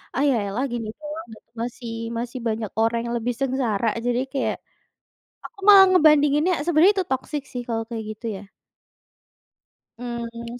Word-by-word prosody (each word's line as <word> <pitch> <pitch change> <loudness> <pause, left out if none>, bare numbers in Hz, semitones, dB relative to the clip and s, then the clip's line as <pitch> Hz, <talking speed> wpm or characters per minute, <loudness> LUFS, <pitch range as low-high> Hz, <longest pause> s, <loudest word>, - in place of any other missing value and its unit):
"Ah, 275 - +1
ya 265 - +3
elah 215 +7 -2
gini 230 -2 -3
doang 305 0 -7
gitu, - - -22
masih 240 -1 -6 0.3
masih 240 +2 -4
banyak 220 -2 -2
orang 230 +1 +2
yang 235 0 -2
lebih 245 +2 -2
sengsara," 250 -5 0 0.2
jadi 245 0 +1
kayak 275 - 0 0.9
aku 480 - -11
malah 395 -2 +10
ngebandinginnya 300 0 +4
sebenarnya 345 +4 +5
itu 370 -2 0
toxic 275 +2 -2
sih 245 - -4
kalau 225 -1 -1
kayak 225 -2 -4
gitu 215 +2 -9
ya. - - -11 1.6
Mmm, 235 0 -6
245 Hz, 155 wpm, -23 LUFS, 230-295 Hz, 1.6 s, malah